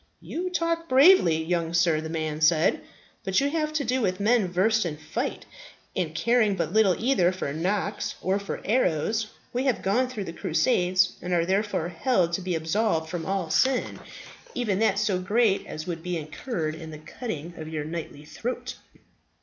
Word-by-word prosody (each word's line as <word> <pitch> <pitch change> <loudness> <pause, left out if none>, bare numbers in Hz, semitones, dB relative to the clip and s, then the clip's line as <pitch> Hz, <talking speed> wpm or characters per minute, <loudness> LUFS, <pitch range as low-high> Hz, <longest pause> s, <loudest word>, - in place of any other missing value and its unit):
"You 360 +3 -4
talk 335 -1 -1
bravely, 260 - +6
young 170 0 -1
sir," 170 -3 +3
the 160 - -6
man 155 -1 -3
said. 160 0 +3 0.4
"But 190 -1 +2
you 280 +1 0
have 305 -1 -1
to 310 -2 0
do 255 +1 0
with 185 -3 0
men 215 0 +3
versed 215 +5 +2
in 160 -4 -4
fight, - - -4 0.5
and 165 -4 -2
caring 225 +1 +2
but 170 -1 -2
little 210 -4 +4
either 225 -7 +2
for 185 -7 -4
knocks 200 +5 -2
or 190 +2 0
for 200 - -6
arrows. 215 0 +1 0.3
We 250 +2 -1
have 260 -4 0
gone 235 +7 +2
through 220 -5 -4
the 165 - -7
Crusades, 185 -3 +2
and 180 0 -3
are 170 -1 +2
therefore 190 -2 0
held 175 -1 +1
to 190 - 0
be 180 -1 -2
absolved 160 0 0
from 170 -2 -4
all 190 -4 -1
sin, 260 -1 +1 0.6
even 210 -6 0
that 215 -3 +2
so 205 -3 +1
great 205 +2 +1
as 155 - -6
would 170 -2 -4
be 180 0 -3
incurred 155 - -4
in 160 0 -8
the 155 - -8
cutting 165 - -6
of 155 -1 -7
your 155 -2 -3
knightly 155 -2 -6
throat." 245 +8 -5
185 Hz, 180 wpm, -26 LUFS, 165-230 Hz, 0.6 s, bravely